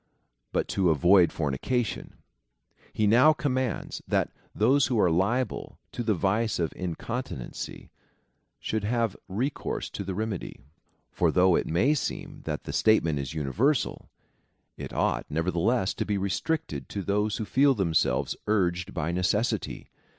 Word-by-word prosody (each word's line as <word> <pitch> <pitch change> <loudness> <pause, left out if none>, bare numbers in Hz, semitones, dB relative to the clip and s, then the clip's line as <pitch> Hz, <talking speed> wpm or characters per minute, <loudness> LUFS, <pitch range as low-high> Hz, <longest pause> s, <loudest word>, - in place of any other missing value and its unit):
But - - 0
to 95 -3 +2
avoid 85 +4 +5
fornication. 85 - -2 0.8
He 110 - 0
now 125 +9 +6
commands, 130 -5 -2
that - - +1 0.2
those 130 +6 +4
who 120 -4 0
are 90 - +4
liable 100 +8 0
to - - -4
the 110 -3 +1
vice 105 +5 +1
of 85 -2 -1
incontinency 90 - -5 0.7
should 110 -1 -2
have 115 -1 0
recourse 120 +9 -3
to - - -5
the 95 -1 -4
remedy. 110 -2 -4 0.5
For - - +2
though 90 -1 +4
it - - 0
may 110 - +3
seem 150 - -4
that - - -3
the - - -6
statement 85 -9 +3
is 70 +3 -5
universal, 110 - 0 0.7
it - - -7
ought, - - 0
nevertheless, 90 +7 +1
to - - -2
be 105 - -1
restricted 95 - -2
to 100 - -4
those 105 +2 0
Avho 110 - -3
feel 135 +4 +4
themselves 80 - +1
urged 90 -3 0
by 80 0 -1
necessity. 90 +6 -1
100 Hz, 140 wpm, -27 LUFS, 85-120 Hz, 0.8 s, now